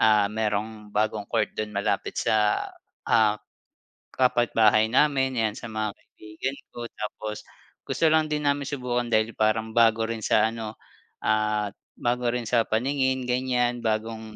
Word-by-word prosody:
ah, 105 -2 +5
merong 105 0 -2
bagong 105 -1 0
court 110 -3 0
do'n 110 - -2
malapit 100 - -1
sa, 105 -1 +2 0.4
ah, 110 -2 +4 0.8
kapitbahay 115 -4 +3
namin 130 -2 +2
'yan 110 -2 0
sa 120 - -7
mga 110 -1 -2
kaibigan 110 +6 -7 0.2
ko 120 - -5
tapos 105 0 -5 0.5
gusto - - 0
lang 160 -1 +3
din 150 -1 -2
namin 140 -1 +1
subukan 125 -3 -2
dahil 110 0 +2
parang 110 +1 +1
bago 115 -1 +4
rin 115 0 -4
sa, 110 +1 +4
ano, 110 -1 -6 0.5
ah, 105 -1 +1 0.3
bago 120 0 0
rin 125 - -2
sa 115 -2 +3
paningin 130 +2 0
ganyan 125 -1 +1
bagong 110 0 -2
110 Hz, 140 wpm, -26 LUFS, 110-125 Hz, 0.8 s, ah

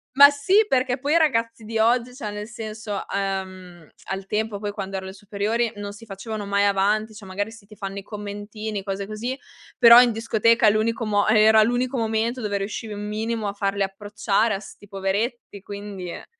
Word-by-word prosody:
Ma 285 +1 +10
sì, 375 +10 +3
perché 255 -3 +1
poi 285 +4 -1
i - - +6
ragazzi 230 -7 +1
di 225 +1 -4
oggi, 240 +2 +2
cioè 215 -6 -5
nel 210 +1 -6
senso 220 -3 -6 0.2
uhm, 185 -4 -4 0.2
al 195 0 -4
tempo, 210 +1 -2
poi 205 -1 -3
quando 195 -1 -6
ero 190 0 -4
alle 190 - -7
superiori, 210 +3 -1
non 205 0 -6
si 230 +2 -13
facevano 210 +1 -6
mai 200 0 +2
avanti, 210 +2 +1
cioè 210 - -11
magari 205 +3 -3
sì, 220 -3 -15
ti 210 - -14
fanno 195 -1 -5
i - - -7
commentini, 205 0 -6
cose 195 0 -3
così, 230 +6 -4 0.4
però 235 0 +10
in 245 -1 +4
discoteca 225 0 +3
l'unico 225 +2 0
mo 205 -1 +1
era 220 0 +6
l'unico 245 +3 +1
momento 225 +2 -1
dove 205 -2 -1
riuscivi 210 +2 -5
un 205 0 -5
minimo 220 0 -2
a 200 - -3
farli 200 0 -1
approcciare 205 +2 0
a - - -4
'sti 205 0 -13
poveretti, 200 +2 -3
quindi, 200 -3 -7
eh - - -8
215 Hz, 195 wpm, -23 LUFS, 200-230 Hz, 0.4 s, Ma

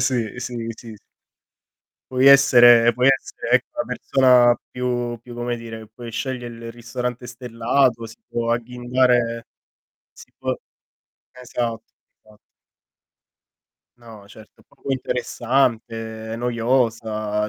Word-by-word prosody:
sì, 125 -4 0
sì, 125 -1 -5 0.2
sì, 115 -2 -11
sì. - - -21 1.1
Puoi 130 +1 +3
essere 120 -4 +7
puoi 125 +1 +1
essere, 135 -3 -1
ecco, 125 0 +3
la - - -1
persona 125 -2 +3
più 120 -1 -3
più 120 +1 -12
come 120 0 -3
dire, 110 -1 -9
puoi 120 +1 -10
sceglie 125 +1 -4
il 115 0 -9
ristorante 125 +1 -5
stellato, 120 0 0
si 115 - -13
può 115 0 -2
agghindare 120 0 0 0.7
sì - - -16
può - - -2 0.8
esatto, 120 -2 -4 0.4
esatto. 105 -1 -21 1.6
No, 110 -4 -14
certo. 110 +2 -17
Poco, 135 - -7
interessante, 115 -3 -2
noiosa. 115 -3 -1
120 Hz, 110 wpm, -22 LUFS, 115-125 Hz, 1.6 s, essere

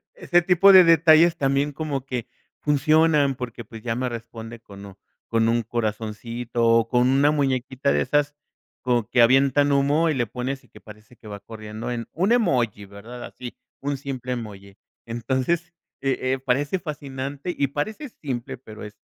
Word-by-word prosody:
Ese 175 - +2
tipo 180 +3 +6
de 185 -1 +9
detalles 165 0 +5
también 140 +1 0
como 140 -3 -4
que 125 -3 -4 0.3
funcionan 150 -1 +3
porque 120 -2 -7
pues 110 +1 -11
ya 115 -1 -2
me 125 +2 -2
responde 115 -1 -8
con 100 -3 -13
o, 95 0 -14 0.3
con 115 0 +2
un 115 0 +1
corazoncito 115 +1 -3
o 115 0 +4
con 125 +1 +2
una 140 +2 +4
muñequita 130 - 0
de 75 0 +2
esas 145 - 0 0.5
como 120 -3 +1
que 120 - +4
avientan 135 +3 +4
humo 145 +4 +2
y 155 - +1
le 120 -3 0
pones, 130 +5 -5
y - - -23
que - - -16
parece 105 +2 -15
que 110 - -14
va 100 -1 -8
corriendo 110 +1 -8
en 120 -1 -4
un 190 +7 +1
emoji, 120 - +1
¿verdad? 110 +5 -11
Así, 125 -1 -9 0.3
un 140 0 -2
simple 130 -2 -5
emoji. 100 -5 -7 0.3
Entonces, 130 +9 -2 0.3
eh 135 -1 0 0.2
eh, - - -4
parece 135 +7 0
fascinante 140 0 -6
y 140 - +1
parece 215 - -4
simple, 130 - -6
pero 110 -4 -11
es, 105 0 -11
130 Hz, 175 wpm, -23 LUFS, 115-145 Hz, 0.5 s, de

